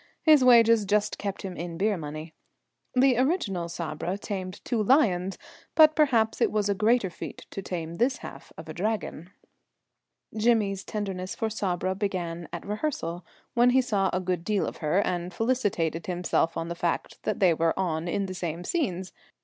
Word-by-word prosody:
His 305 -4 +6
wages 230 -3 +6
just 210 +1 0
kept 200 0 -4
him 190 -2 -5
in 170 -1 -5
beer 205 +3 +2
money. 155 0 -7 0.6
The 255 -1 +4
original 220 - 0
Sabra 170 +2 -3
tamed 190 -3 -5
two 235 -3 0
lions, 195 - +3 0.4
but 310 -1 +7
perhaps 235 -8 +2
it - - +3
was 210 -1 +1
a 200 - +2
greater 215 -1 +2
feat - - -8
to 195 - -5
tame 170 -3 -5
this 255 +4 +2
half - - -10
of 160 - -9
a 155 - -6
Dragon. 185 -3 -3 1.1
Jimmy's 215 -3 +2
tenderness 190 -3 -4
for 225 -1 -2
Sabra 185 -3 -1
began 175 -4 -3
at 170 - -6
rehearsal, 205 - -3 0.3
when 240 +1 +5
he 260 +1 +5
saw 200 -6 +1
a 185 - 0
good 180 -2 -2
deal 205 0 0
of - - -5
her, 170 +5 +1
and 175 0 -2
felicitated 190 -8 -1
himself 175 -2 0
on 165 - -2
the 170 - -3
fact 170 0 -3
that - - -2
they 185 -4 +5
were 165 0 +1
on 170 -3 -1
in 195 +3 -1
the 185 - -5
same 175 -1 -4
scenes. 190 - -2
195 Hz, 175 wpm, -27 LUFS, 175-225 Hz, 1.1 s, but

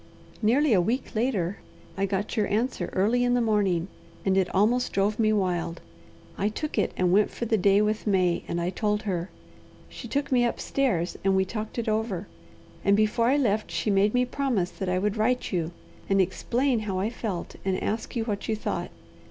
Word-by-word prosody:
"Nearly 250 +5 +3
a 185 - +5
week 235 +9 -2
later 215 -6 0 0.4
I 195 +1 0
got 200 +3 -2
your 215 -3 +1
answer 235 +5 -1
early 225 +6 +2
in 245 0 +2
the - - +3
morning, 200 -6 +1 0.4
and 190 -1 +3
it 190 -2 +2
almost 235 +6 +2
drove 205 +3 +1
me 215 -1 +3
wild. 175 -5 0 0.6
I 205 - +2
took 290 +3 -3
it 205 - +1
and 180 -1 +2
went 205 +3 +4
for 235 - -5
the 225 - +2
day 200 0 +4
with 215 +1 -1
May, 185 -4 +2
and 170 - -2
I 175 +1 -1
told 210 +2 -1
her. 180 -4 -2 0.6
She 235 - -8
took 275 +4 -2
me 245 -2 +4
upstairs, 235 -6 0
and 195 0 +3
we 190 0 +3
talked 215 +3 -5
it 235 - -2
over, 215 -4 -1 0.6
and 200 0 +4
before 215 +2 +2
I 270 +3 +4
left 215 -6 +1
she 215 - -1
made 200 +3 +3
me 250 0 +3
promise 245 -9 -1
that 190 -2 -4
I 180 - +1
would 205 +3 0
write 245 +4 +1
you 170 -4 -1 0.4
and 195 0 +3
explain 240 +7 +1
how 205 -3 -3
I 200 +4 -1
felt, 210 -7 -5
and 190 -1 0
ask 220 +4 -3
you 230 - 0
what 210 -2 -4
you 220 - +2
thought. 175 -4 -3
210 Hz, 200 wpm, -26 LUFS, 190-235 Hz, 0.6 s, a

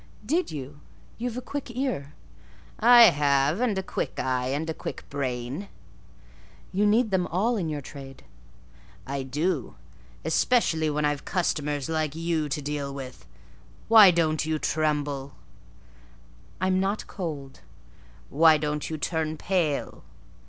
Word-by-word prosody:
"Did 330 +10 0
you? 145 -1 -7 0.4
You've 245 0 -3
a 250 - -5
quick 280 0 -5
ear." 240 - -3 0.6
"I 240 +1 +8
have; 145 - +2
and 230 -6 +1
a 190 - -1
quick - - -4
eye 125 -1 0
and 145 +5 -2
a 160 - -2
quick - - -7
brain." 130 +5 -3 1.0
"You 205 +3 +2
need 220 +1 +3
them 185 -2 +1
all 215 +8 +1
in 175 -7 -2
your 150 -2 -3
trade." 135 -1 -11 0.8
"I 140 +1 -3
do; 150 +3 -2 0.5
especially 160 -2 +2
when 150 0 0
I've 145 -1 -1
customers 150 -5 -1
like 155 -2 -1
you 165 -2 -1
to 145 +1 -3
deal 145 -1 -3
with. 130 - -9 0.6
Why 220 -4 +9
don't 160 -3 +1
you 155 0 -1
tremble?" 145 -3 -1 1.2
"I'm 185 +1 +1
not 195 +2 -1
cold." 145 -7 -6 0.7
"Why 160 +1 +6
don't 150 0 -3
you 160 - -3
turn 160 0 -2
pale?" 165 -5 -1
155 Hz, 135 wpm, -26 LUFS, 140-190 Hz, 1.2 s, Why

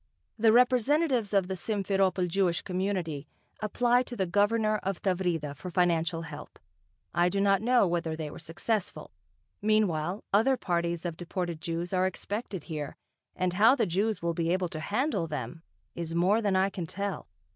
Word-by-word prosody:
The 225 0 +5
representatives 250 0 +3
of 195 -3 +2
the 190 - -2
Simferopol 195 -2 0
Jewish 175 -1 +1
community 180 -6 -2 0.3
applied 245 +3 +2
to 245 - -6
the 195 -4 0
Governor 215 +3 +2
of 195 -2 -3
Tavrida 175 -7 -1
for 180 +6 -7
financial 170 -1 +1
help. 150 -2 -9 0.6
I 175 +1 +3
do 195 +2 -1
not 195 0 +3
know 245 -1 +4
whether 170 -2 -1
they 155 -2 -5
were - - -9
successful. 195 +4 -3 0.5
Meanwhile, 200 -4 +1
other 250 +6 +4
parties 170 -3 -1
of 170 -2 -3
deported 175 -2 -4
Jews 170 +2 -3
are 185 0 +3
expected 200 -2 -5
here, 150 -4 -5 0.4
and 185 -1 0
how 220 +7 +6
the 235 -5 +1
Jews 200 +3 -1
will 170 0 0
be 165 0 0
able 180 -1 0
to 160 -3 -6
handle 210 - -1
them, 150 0 -5 0.3
is 165 -1 -5
more 190 +6 +3
than 200 -3 +1
I 190 +1 +2
can 175 -4 -5
tell. 200 - -4
185 Hz, 170 wpm, -29 LUFS, 170-210 Hz, 0.6 s, how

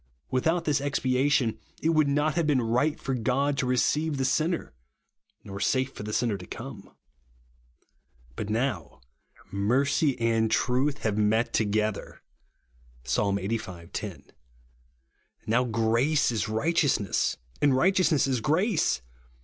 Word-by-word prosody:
Without 165 +7 +1
this 145 -2 +1
expiation, 135 -3 +1 0.2
it 160 - 0
would 155 -3 +3
not 145 +2 +1
have 165 0 0
been 145 -4 +3
right 125 +6 0
for 135 - -3
God 130 +4 0
to 125 - 0
receive 145 +4 +1
the 135 - 0
sinner, 155 - 0 0.7
nor 100 0 -7
safe 130 +5 0
for - - -8
the 105 +1 -5
sinner 110 -3 0
to 90 - -10
come. - - -9 1.5
But 100 - -5
now, 110 - -2 0.5
mercy 130 +8 +1
and 115 -1 +2
truth 130 +6 0
have 110 -1 0
met 110 +2 +1
to 110 - +2
gether 105 0 -2 0.8
(Psa. 65 +2 0
Ixxxv. 100 -3 -3
10); - - -5 1.2
now 120 +3 +2
grace 115 +6 +2
is 110 -2 -2
right 115 +10 0
eousness, 125 - +1 0.2
and 145 -3 +4
righteousness 180 -3 +3
is 130 -4 -1
grace. 160 - +1
125 Hz, 135 wpm, -27 LUFS, 110-145 Hz, 1.5 s, and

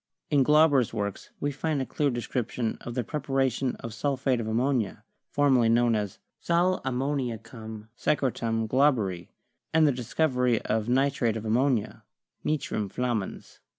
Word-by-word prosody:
In 145 -2 +4
Glauber's 150 -3 +4
works 100 -1 -3
we 145 - -1
find 150 +1 -1
a 130 - -1
clear 145 +2 0
description 120 -1 -2
of 120 - -7
the 125 - 0
preparation 135 -2 -1
of 115 - -6
sulphate 135 -2 0
of 110 - -3
ammonia, 115 -2 0 0.3
formerly 130 -5 +3
known 120 0 +4
as 105 -3 -2 0.2
"sal 175 +2 +2
ammoniacum 120 -5 -3
secre 135 -3 +1
tum 115 -1 -1
Glauberi," 110 - +2 0.4
and 160 0 +5
the 145 - +4
discovery 125 -1 +1
of 110 +1 -1
nitrate 130 -3 +2
of 110 - -6
ammonia, 120 0 +1 0.4
'nitrum 135 -9 -1
flammans.' 120 -3 -3
125 Hz, 140 wpm, -27 LUFS, 115-140 Hz, 0.4 s, and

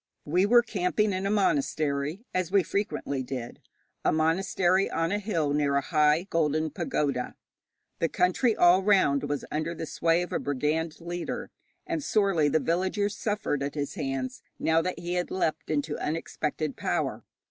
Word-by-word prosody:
We 180 +6 +2
were 240 +2 +6
camping 210 -1 0
in 190 +1 -1
a - - 0
monastery, 155 - 0
as 185 -1 -1
we 195 -2 +4
frequently 160 -7 -2
did 125 -2 -6 0.4
a - - +3
monastery 180 +4 +2
on 165 +1 -1
a 205 - +1
hill 165 -9 0
near 145 -1 +1
a 140 - +3
high 150 +1 +2
golden 155 -1 +1
pagoda. 140 -4 -2 0.6
The 165 - +1
country 210 +6 +2
all 175 +2 +5
round 145 -9 +3
was 145 -1 -2
under 155 +3 -2
the 160 - -4
sway 165 +3 +1
of 180 - -7
a - - +1
brigand 150 +4 -1
leader, 175 +1 -4 0.3
and 330 -4 -2
sorely 195 - +2
the 160 - +2
villagers 190 +5 0
suffered 205 -11 -1
at 140 +1 -3
his 145 -2 -3
hands 130 -1 -3 0.2
now 160 0 +2
that 185 +2 -3
he 175 +1 -4
had 180 0 -1
leapt 165 -4 -1
into 150 0 -1
unexpected 155 -1 -3
power. - - -2
165 Hz, 165 wpm, -27 LUFS, 150-190 Hz, 0.6 s, were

